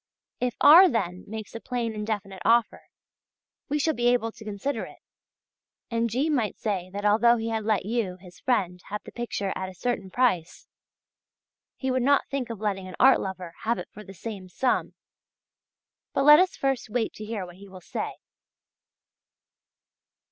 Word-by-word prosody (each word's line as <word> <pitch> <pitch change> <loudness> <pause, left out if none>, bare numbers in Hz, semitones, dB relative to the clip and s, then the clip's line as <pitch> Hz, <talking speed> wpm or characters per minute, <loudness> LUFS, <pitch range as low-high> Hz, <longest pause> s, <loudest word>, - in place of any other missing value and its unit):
If 250 -1 -1
R. 350 +6 +9
then 185 -7 -2
makes 220 0 -7
a 230 - -5
plain 240 -2 -3
and 210 0 -5
definite 195 -4 -4
offer, 230 -1 +2 0.8
we 295 - +1
shall 315 +2 +1
be 240 -3 0
able 245 -2 +2
to 220 - -13
consider 215 +7 -3
it - - -13 0.9
and 230 0 +1
G. 260 +7 0
might 255 -9 0
say 190 -4 -2
that 205 +2 -5
although 235 +3 +5
he 225 0 -3
had 220 -1 -2
let 215 -3 +1
you, 210 -5 -1
his 180 -1 -15
friend, 180 -8 0
have 210 +1 -4
the - - -11
picture 230 -5 -3
at 190 - -4
a 185 - -12
certain 215 -2 -2
price, 185 -7 0 1.1
he 265 -1 -1
would 255 0 +1
not 280 +3 +3
think 275 -3 -2
of 230 -3 -6
letting 195 -3 -2
an 185 - -8
art 265 +1 +6
lover 185 -3 -6
have 230 +2 0
it - - -7
for 210 - -11
the 195 -1 -12
same 195 -3 -7
sum. 250 +8 0 1.2
But 275 - +1
let 300 +2 +9
us 370 0 +2
first 270 -4 -1
wait 225 +1 -1
to 215 - -9
hear 215 -3 -4
what 175 0 -13
he 200 +1 -13
will 185 -1 -11
say. - - -4
220 Hz, 180 wpm, -26 LUFS, 195-245 Hz, 1.2 s, R